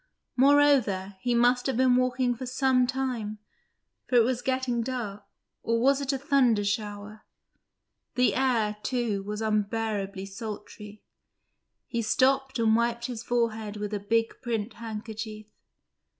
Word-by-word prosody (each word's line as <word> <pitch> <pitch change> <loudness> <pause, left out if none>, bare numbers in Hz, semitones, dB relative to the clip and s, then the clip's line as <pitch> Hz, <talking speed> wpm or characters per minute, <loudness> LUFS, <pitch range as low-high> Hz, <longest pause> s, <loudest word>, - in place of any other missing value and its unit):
Moreover, 260 -9 +3
he 245 -1 +1
must 245 +2 +3
have 265 - -1
been 255 -1 +4
walking 255 0 +1
for 250 +2 -7
some 255 -1 +2
time, 250 -5 -3 0.7
for 250 - 0
it 235 - +7
was 250 +1 0
getting 260 -2 0
dark, 225 -5 -4 0.4
or 230 0 0
was 275 +3 +3
it 275 0 -1
a 270 - -1
thunder 260 -6 +2
shower? 205 +1 -4 0.9
The 250 0 +3
air, 230 -5 +1
too, 235 -6 -1
was 210 +2 -4
unbearably 210 -2 -1
sultry; 210 0 -8 0.8
he 235 - -2
stopped 265 +4 +2
and 225 -1 +3
wiped 235 0 0
his 240 -3 -5
forehead 225 -3 -1
with 210 0 -4
a 205 - -1
big 225 +3 -1
print 225 -2 -3
handkerchief. 220 -1 -7
230 Hz, 135 wpm, -27 LUFS, 210-255 Hz, 0.9 s, it